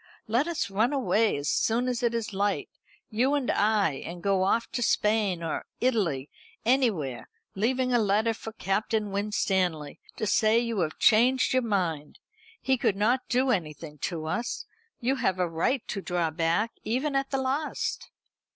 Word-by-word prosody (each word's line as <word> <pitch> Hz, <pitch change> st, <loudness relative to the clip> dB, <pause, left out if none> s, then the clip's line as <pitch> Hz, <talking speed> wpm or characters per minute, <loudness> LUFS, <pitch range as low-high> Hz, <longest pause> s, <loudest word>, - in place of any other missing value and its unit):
Let 240 Hz, +8 st, +1 dB
us 335 Hz, -12 st, -2 dB
run 220 Hz, +8 st, +1 dB
away 220 Hz, -, +2 dB
as 145 Hz, +1 st, -4 dB
soon 235 Hz, +8 st, +1 dB
as 250 Hz, -2 st, -1 dB
it 235 Hz, -1 st, +1 dB
is 215 Hz, -3 st, -3 dB
light, 200 Hz, +1 st, -1 dB, 0.4 s
you 255 Hz, +6 st, +2 dB
and 275 Hz, -4 st, 0 dB
I, 210 Hz, -4 st, +2 dB
and 175 Hz, 0 st, -8 dB
go 195 Hz, -1 st, +2 dB
off 230 Hz, +5 st, +2 dB
to 245 Hz, -, -2 dB
Spain, 210 Hz, -6 st, +1 dB
or 165 Hz, -, -2 dB, 0.2 s
Italy, 190 Hz, -, 0 dB, 0.4 s
anywhere, 220 Hz, -, +1 dB, 0.2 s
leaving 250 Hz, +5 st, 0 dB
a 240 Hz, -, +4 dB
letter 215 Hz, +2 st, +2 dB
for 225 Hz, 0 st, -8 dB
Captain 210 Hz, +1 st, -1 dB
Winstanley, 190 Hz, -6 st, -1 dB, 0.2 s
to -, -, -2 dB
say 215 Hz, +2 st, +3 dB
you 235 Hz, -3 st, 0 dB
have 155 Hz, -3 st, -1 dB
changed 250 Hz, +5 st, +4 dB
your 255 Hz, -, +3 dB
mind. 175 Hz, -10 st, -2 dB, 0.4 s
He 265 Hz, -1 st, +1 dB
could 200 Hz, -, +2 dB
not 235 Hz, +6 st, +1 dB
do 255 Hz, +1 st, +2 dB
anything 155 Hz, -5 st, -3 dB
to 160 Hz, 0 st, -3 dB
us. 235 Hz, +9 st, -3 dB, 0.3 s
You 265 Hz, +2 st, 0 dB
have 190 Hz, -7 st, 0 dB
a 180 Hz, -1 st, +1 dB
right 170 Hz, +10 st, -1 dB
to 195 Hz, -, -3 dB
draw 175 Hz, -3 st, -1 dB
back, 170 Hz, +8 st, 0 dB
even 265 Hz, +6 st, -1 dB
at 275 Hz, 0 st, 0 dB
the 270 Hz, -, -1 dB
last." 270 Hz, +3 st, -2 dB
215 Hz, 170 wpm, -27 LUFS, 180-245 Hz, 0.4 s, a